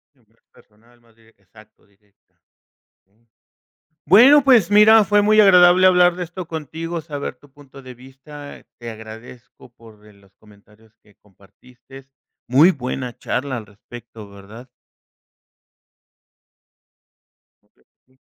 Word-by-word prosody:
Es 120 -5 -36
mas 115 +2 -38
personal, 115 +3 -27
mas 115 -1 -30
directa, 115 -3 -29
exacto, 105 +3 -23
directa, 100 0 -40 0.6
okey. 110 +5 -41 0.8
Bueno, 255 - +5
pues 240 -9 +2
mira, 215 +1 +5
fue 205 +1 0
muy 215 +1 +1
agradable 180 -2 +4
hablar 180 -1 +2
de 180 - -6
esto 175 0 -10
contigo, 165 +2 -8
saber 145 -2 -8
tu 145 - -25
punto 140 -1 -18
de 130 -1 -12
vista. 135 +3 -15 0.2
Te 120 -1 -9
agradezco 110 +3 -15
por 110 -3 -21
eh, 105 - -20
los 100 -1 -27
comentarios 105 +1 -25
que 105 -1 -27
compartiste. 120 +7 -21 0.4
Muy 145 +9 +3
buena 125 -3 -7
charla 130 -1 -5
al 110 - -10
respecto, 110 +1 -15
¿verdad? 105 +6 -16 3.0
Okey, - - -39 0.2
sí. 130 +1 -36
125 Hz, 130 wpm, -18 LUFS, 110-165 Hz, 3.0 s, Bueno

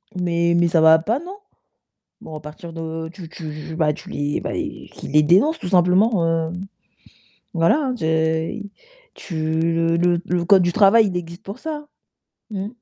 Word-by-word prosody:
Mais 170 -1 +1
mais 170 0 +3
ça 165 -1 +2
va 160 0 +7
pas, 220 - -1
non? 365 +5 -9 0.8
Bon, 155 - -9
à - - -8
partir 155 +3 -10
de 160 0 -5
tu 175 -3 -10
tu 155 -1 -8
bah, 155 -2 +2
tu - - -11
les 145 0 -2
bah, - - -4
qu'ils - - -6
les 150 0 +5
dénoncent 195 - +3
tout - - -6
simplement, 180 +2 +3 0.3
heu, - - -7 1.0
voilà, 165 - +3
hein, 265 -4 -1
te 160 -1 0 0.5
tu 170 - -9 0.2
le 165 0 +1
le 175 0 +2
le 175 -1 -1
code 190 +1 +6
du 175 0 +1
travail, 215 +2 +5
il 180 -2 -2
existe 170 0 -8
pour 200 +6 -8
ça, 300 -1 -6 0.6
mmh. 195 -1 -3
170 Hz, 175 wpm, -21 LUFS, 160-195 Hz, 1.0 s, va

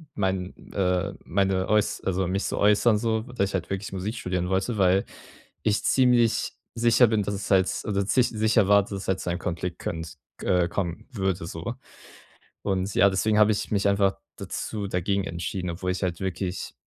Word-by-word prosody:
mein, 95 -2 -1 0.2
äh 95 0 0
meine 95 0 +1
äuß 105 -1 +2
also 95 0 0
mich 95 +2 -1
zu - - -2
äußern 105 +2 +4
so, 110 0 0
dass 100 -6 0
ich - - -9
halt 90 -3 -3
wirklich 95 0 -4
Musik 95 +4 -3
studieren 90 -4 -2
wollte, 95 +5 0
weil 95 +1 +4 0.6
ich 105 -1 +1
ziemlich 125 -3 +3 0.2
sicher 120 +1 +5
bin, 110 -1 +1
dass 100 +1 -2
es 100 +1 -5
halt 95 -1 +5 0.2
also 100 -2 0
zich 120 +5 +2
sicher 110 -2 +2
war, 100 0 +7
dass 100 -1 -6
halt 95 0 +1
zu - - -3
einem 85 - -1
Konflikt 90 0 -3
können, 80 -1 -4 0.4
äh 90 -2 +2
kommen 95 +3 -3
würde 95 -7 -1
so. - - -5 0.9
Und 95 0 -1
ja, 100 - +5
deswegen 105 +3 +1
hab 105 - +6
ich 105 - -1
mich 100 -1 +2
einfach 100 -1 +2 0.2
dazu 105 -2 -4
dagegen 95 +2 0
entschieden, 90 +1 -4
obwohl 90 +2 -3
ich 95 - -5
halt 90 -2 -2
wirklich 95 0 -3
95 Hz, 185 wpm, -26 LUFS, 90-105 Hz, 0.9 s, war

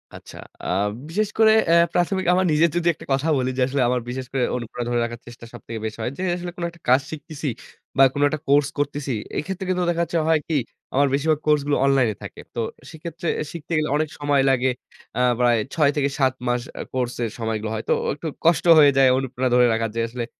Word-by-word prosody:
আচ্ছা। - - -12 0.3
আ - - -7 0.4
বিশেষ 210 +4 0
করে 220 -1 +7 0.2
এ - - +5 0.2
প্রাথমিক 185 +2 0
আমার 185 +1 +2
নিজে 155 +2 +4
যদি 175 0 0
একটা - - -13
কথা 135 +4 0
বলি 130 0 0
যে, - - 0
আসলে 135 0 -1
আমার 125 -1 0
বিশেষ 130 +1 -4
করে 130 -2 0
অনুপ্রেরণা 120 0 -5
ধরে 120 -1 +1
রাখার 120 +1 -5
চেষ্টা 120 -1 -11
সবথেকে 115 -1 -7
বেশি 110 - -5
হয়। 120 - -2
যে - - -5
আসলে 175 0 -5
কোন 175 - -6
একটা 170 -1 -19
কাজ 130 +2 +5
শিখতেছি 155 -1 -5 0.5
বা 135 - +7
কোন 145 - -2
একটা 155 - -3
কোর্স 140 +1 +4
করতেছি। 145 -1 -2 0.2
এক্ষেত্রে 190 +4 -4
কিন্তু 180 -1 +1
দেখা 170 0 0
যাচ্ছে 170 - -2
হয় 160 -1 +4
কি? 160 -3 +1 0.4
আমার 140 +1 +3
বেশিরভাগ 150 +2 +1
কোর্সগুলো 145 -1 +2
অনলাইনে 130 -6 +2
থাকে। - - -9
তো - - -3 0.3
সেক্ষেত্রে 170 +1 -7
এ - - -1
শিখতে 170 0 -9
গেলে 155 0 0
অনেক 155 0 -1
সময় 145 -1 +2
লাগে। 130 0 +2 0.5
আ - - +2 0.2
প্রায় 120 -2 +4 0.2
৬ 150 -4 +3
থেকে 140 -1 +1
৭ 130 -2 +3
মাস 120 0 +1 0.2
আ - - -2
কোর্সের 120 -2 -2
সময়গুলো 110 -1 -2
হয়। 110 - -3
তো - - +5
ও - - -1
একটু 160 - -6 0.2
কষ্ট 170 -1 +3
হয়ে 145 -2 +7
যায় 135 -1 +6
অনুপ্রেরণা 130 -1 -1
ধরে 125 0 +6
রাখা 115 0 0
যে 115 - +1
আসলে 120 0 -4
140 Hz, 220 wpm, -23 LUFS, 125-160 Hz, 0.5 s, করে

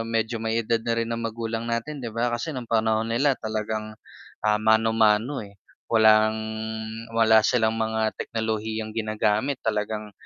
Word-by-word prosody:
medyo 115 0 -1
may 115 0 -1
edad 115 0 +1
na 115 0 -1
rin 115 0 -1
ang 115 - -3
magulang 115 +1 -4
natin 115 +6 -3
'di 120 - -4
ba, 115 +2 -1
kasi 120 +7 -3
nung 125 - -4
panahon 110 0 +1
nila 135 +3 +2
talagang, 110 0 -3 0.5
ah, 105 0 +2
mano-mano, 110 +3 +2
eh, 100 -1 -17 0.3
walang 110 -1 +5 0.8
wala 110 -1 +6
silang 110 -3 +2
mga 110 -1 0
teknolohiyang 110 -1 -3
ginagamit 110 +4 0
talagang 105 -1 -2
110 Hz, 145 wpm, -25 LUFS, 110-115 Hz, 0.8 s, wala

